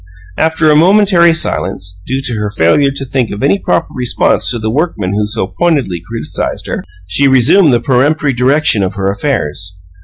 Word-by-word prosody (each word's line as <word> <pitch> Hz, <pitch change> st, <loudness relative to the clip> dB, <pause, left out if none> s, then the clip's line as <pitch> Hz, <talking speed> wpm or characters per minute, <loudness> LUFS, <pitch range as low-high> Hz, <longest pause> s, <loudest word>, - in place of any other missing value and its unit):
After 160 Hz, -, +1 dB
a -, -, +4 dB
momentary 180 Hz, 0 st, +4 dB
silence, 95 Hz, -, -2 dB
due 130 Hz, +2 st, -2 dB
to 125 Hz, -, -1 dB
her 105 Hz, -2 st, -3 dB
failure 100 Hz, -, +2 dB
to 135 Hz, 0 st, -5 dB
think 130 Hz, -2 st, -2 dB
of 100 Hz, -, -6 dB
any 170 Hz, +8 st, +2 dB
proper -, -, -1 dB
response 125 Hz, -1 st, +1 dB
to 120 Hz, -, 0 dB
the 110 Hz, -1 st, -3 dB
workman 120 Hz, -, -2 dB
who 105 Hz, 0 st, -1 dB
so 105 Hz, -2 st, -1 dB
pointedly 130 Hz, -, -1 dB
criticized 115 Hz, 0 st, -3 dB
her, -, -, -4 dB, 0.2 s
she 115 Hz, +11 st, +1 dB
resumed 135 Hz, +6 st, +4 dB
the 120 Hz, -2 st, +1 dB
peremptory 140 Hz, +3 st, +1 dB
direction 125 Hz, -2 st, +2 dB
of 95 Hz, +1 st, -2 dB
her 100 Hz, -1 st, -1 dB
affairs. 95 Hz, -, -3 dB
125 Hz, 180 wpm, -12 LUFS, 100-150 Hz, 0.2 s, a